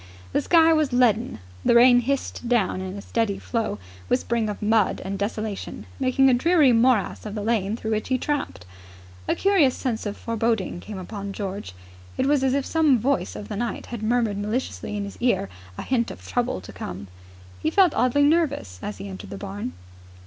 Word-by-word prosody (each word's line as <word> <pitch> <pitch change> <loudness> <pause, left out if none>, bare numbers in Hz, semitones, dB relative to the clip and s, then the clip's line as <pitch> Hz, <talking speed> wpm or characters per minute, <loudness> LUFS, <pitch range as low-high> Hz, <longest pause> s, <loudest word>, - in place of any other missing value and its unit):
The - - +2
sky 330 -1 +5
was 310 -3 +2
leaden. 245 -1 +2 0.3
The 235 - +4
rain 245 +1 +7
hissed 255 -1 -2
down 215 -6 +1
in 190 +1 -5
a 200 - -8
steady 225 -4 -1
flow, 225 - -2 0.3
whispering 235 -3 0
of 205 - -5
mud 215 -1 +2
and 195 +1 -3
desolation, 210 0 -4
making 270 0 +3
a 260 - +5
dreary 300 0 +4
morass 230 -2 +2
of 210 -1 -6
the 210 - -3
lane 220 -1 0
through 220 -1 -4
which 215 0 -1
he 260 - +1
tramped. 270 - -3 0.6
A - - +2
curious 375 -10 +3
sense 225 -4 -2
of 205 - -5
foreboding 225 -5 -1
came 210 +2 -8
upon 200 +1 -6
George. 195 - -5 0.4
It - - +1
was 285 -1 +2
as 265 0 +2
if 280 -1 0
some 310 -5 +3
voice 235 - 0
of 105 0 -7
the - - -5
night 235 +3 -3
had 235 - -4
murmured 220 -2 +1
maliciously 210 - -3
in 205 - -2
his 200 - -8
ear 240 - +1 0.3
a - - -4
hint 240 -3 0
of 90 0 -10
troubles 95 - -1
to - - -10
come. 95 +2 -7 0.5
He - - +1
felt 365 -1 +4
oddly 255 +4 +3
nervous, 285 - +1
as 105 - -5
he 100 - -7
entered 95 0 -8
the 100 - -6
barn. 95 -2 -5
230 Hz, 195 wpm, -24 LUFS, 200-260 Hz, 0.6 s, rain